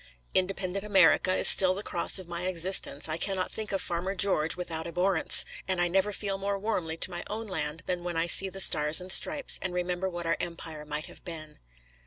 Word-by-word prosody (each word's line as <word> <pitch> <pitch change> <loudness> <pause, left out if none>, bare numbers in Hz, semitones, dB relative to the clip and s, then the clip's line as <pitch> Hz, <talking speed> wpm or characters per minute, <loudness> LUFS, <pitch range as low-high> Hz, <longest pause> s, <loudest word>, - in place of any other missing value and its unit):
Independent 190 +1 -1
America 190 -3 +3
is - - +4
still 185 -1 +6
the 200 - -7
cross 175 - +2
of 185 -2 -3
my 175 +1 -4
existence; 180 -4 +1
I 155 0 -3
cannot 190 +1 -2
think 220 -1 -5
of 195 - -2
Farmer 180 +3 -4
George 180 -5 +2
without 165 -2 -5
abhorrence; 180 +1 +2 0.2
and 185 -2 -1
I 175 - +3
never 195 +3 0
feel 195 -1 -4
more 200 0 -2
warmly 180 -6 -3
to 185 - 0
my 175 0 -6
own 220 +2 -5
land 160 -4 -5
than 180 -1 -3
when 175 -1 -4
I 165 - +1
see 190 +3 +2
the 195 - -10
Stars 150 -3 +4
and 180 +1 -5
Stripes, 280 +8 +4
and 180 -1 -4
remember 180 +1 -3
what 175 -1 -7
our 165 -1 0
empire 165 -3 -7
might 150 +1 -4
have - - -15
been. 155 -3 -9
180 Hz, 215 wpm, -27 LUFS, 165-195 Hz, 0.2 s, still